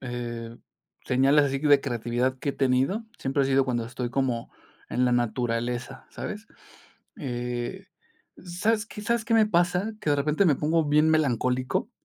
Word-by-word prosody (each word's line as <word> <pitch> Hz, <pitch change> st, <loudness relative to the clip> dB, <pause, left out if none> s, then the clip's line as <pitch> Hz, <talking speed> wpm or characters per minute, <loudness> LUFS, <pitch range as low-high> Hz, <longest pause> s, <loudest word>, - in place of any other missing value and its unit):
eh, 120 Hz, -2 st, -6 dB, 0.5 s
señales, 135 Hz, +3 st, +4 dB
así 135 Hz, 0 st, -1 dB
de 145 Hz, -1 st, +5 dB
creatividad 125 Hz, 0 st, -1 dB
que 140 Hz, -, -1 dB
he -, -, -7 dB
tenido, 135 Hz, -, +1 dB
siempre 135 Hz, +1 st, 0 dB
ha -, -, +1 dB
sido 135 Hz, 0 st, +3 dB
cuando 120 Hz, -3 st, -1 dB
estoy 120 Hz, 0 st, -4 dB
como 125 Hz, -3 st, -1 dB, 0.4 s
en 125 Hz, -, +1 dB
la 125 Hz, -, +2 dB
naturaleza, 120 Hz, +2 st, -2 dB
¿sabes?, 210 Hz, +2 st, -6 dB, 0.7 s
eh, 120 Hz, -2 st, -4 dB, 0.5 s
¿sabes 210 Hz, +5 st, -1 dB
qué 210 Hz, -, -9 dB
sabes 235 Hz, +1 st, 0 dB
qué 230 Hz, -, +1 dB
me 220 Hz, -1 st, +5 dB
pasa?, 180 Hz, +2 st, +1 dB
que 150 Hz, -, -1 dB
de 145 Hz, -, +3 dB
repente 150 Hz, +6 st, +1 dB
me 150 Hz, -5 st, +4 dB
pongo 160 Hz, +3 st, +1 dB
bien 150 Hz, +2 st, +4 dB
melancólico. 130 Hz, -4 st, 0 dB
135 Hz, 160 wpm, -26 LUFS, 120-160 Hz, 0.7 s, de